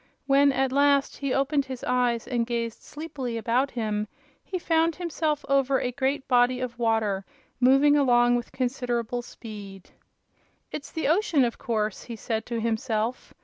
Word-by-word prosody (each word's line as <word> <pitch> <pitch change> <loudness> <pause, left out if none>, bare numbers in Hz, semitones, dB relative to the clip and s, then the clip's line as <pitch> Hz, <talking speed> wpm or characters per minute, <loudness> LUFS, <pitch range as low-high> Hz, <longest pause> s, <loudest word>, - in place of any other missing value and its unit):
When, 280 +1 +5
at 265 -1 0
last, 280 0 +3
he 275 -2 -2
opened 275 +1 +1
his 260 -2 -7
eyes 245 -2 +1
and 235 -3 -1
gazed 230 -1 -3
sleepily 290 -6 -5
about 245 +4 +1
him, 215 -3 -2 0.4
he 375 - -4
found 330 -1 +1
himself 315 -4 -2
over 275 -1 +2
a 250 - -2
great 265 +2 -1
body 250 0 +3
of 245 -2 -5
water, 220 -4 +1 0.4
moving 270 +3 +5
along 245 -4 +4
with 240 -1 -3
considerable 245 -2 -2
speed. 205 -5 -10 0.8
"It's 285 - -7
the 320 - -2
ocean, 320 - +3
of 235 - -4
course," 215 -5 -2
he 235 - -6
said 220 0 -3
to 235 -1 -2
himself. 225 +1 -2
250 Hz, 155 wpm, -26 LUFS, 230-275 Hz, 0.8 s, When